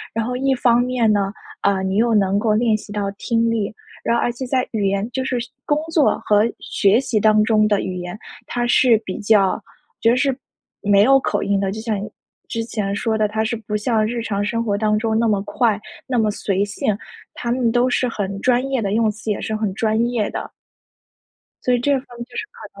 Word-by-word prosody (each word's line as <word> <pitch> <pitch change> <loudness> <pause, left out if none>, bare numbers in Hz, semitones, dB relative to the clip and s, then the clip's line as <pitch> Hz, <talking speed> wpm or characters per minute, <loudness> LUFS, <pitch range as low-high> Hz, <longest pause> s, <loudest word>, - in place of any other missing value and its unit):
然 225 -1 0
后 250 +1 -3
一 270 +1 +1
方 240 -1 +3
面 245 -3 +1
呢， 200 -1 0 0.3
呃， 195 -1 +1
你 190 +1 -1
又 235 +1 +3
能 200 -1 +2
够 215 0 +2
练 225 0 +3
习 210 - -12
到 205 -1 -2
听 230 0 +1
力。 215 -3 -1 0.3
然 235 - +2
而 240 - +1
且 255 +2 -6
在 255 -1 0
语 205 -3 0
言 200 +2 0
就 260 +2 -2
是 250 -2 -1
学 240 +2 -6 0.2
工 295 0 +1
作 315 -4 +3
和 210 0 +4 0.2
学 200 +4 +2
习 230 -5 0
当 215 0 +4
中 215 -1 +3
的 205 -2 +2
语 185 -1 -4
言， 180 +3 -6 0.3
它 240 0 -1
是 240 -1 +5
比 185 - -5
较 205 -2 +4
我 - - -6 0.4
觉 230 - +4
得 245 - +3
是 270 -1 +1 0.5
没 200 -1 +4
有 270 +3 +6
口 - - -1
音 200 -1 +1
的， 195 -1 -1
就 215 - -5
像 220 -3 -2
你 215 - -6 0.4
之 230 - -3
前 205 -3 -3
说 220 +1 0
的， 215 -1 +2
它 220 +1 -1
是 225 +1 -1
不 220 -1 -5
像 215 0 +1
日 235 +1 -2
常 205 -2 -2
生 230 +2 -1
活 205 -3 0
当 215 0 +1
中 220 -1 0
那 230 0 +2
么 205 -3 +1
快、 205 +1 0 0.3
那 250 -3 +1
么 215 - +2
随 195 -1 -1
性。 205 0 -1 0.4
它 235 - -3
们 245 -1 +1
都 245 +1 +2
是 250 0 +1
很 200 -3 -3
专 250 0 +2
业 265 -4 0
的， 200 -1 -1
用 220 0 +3
词 220 +1 -8
也 - - -2
是 220 - -3
很 215 -3 -1
专 220 +1 0
业 230 -4 -1
的。 - - -6 1.1
所 250 - +3
以 - - +2
这 285 +4 +2
方 270 - +2 0.2
面 235 - -6
就 245 0 -14
是 - - -2
可 - - -13
220 Hz, 255 characters per minute, -20 LUFS, 205-240 Hz, 1.1 s, 有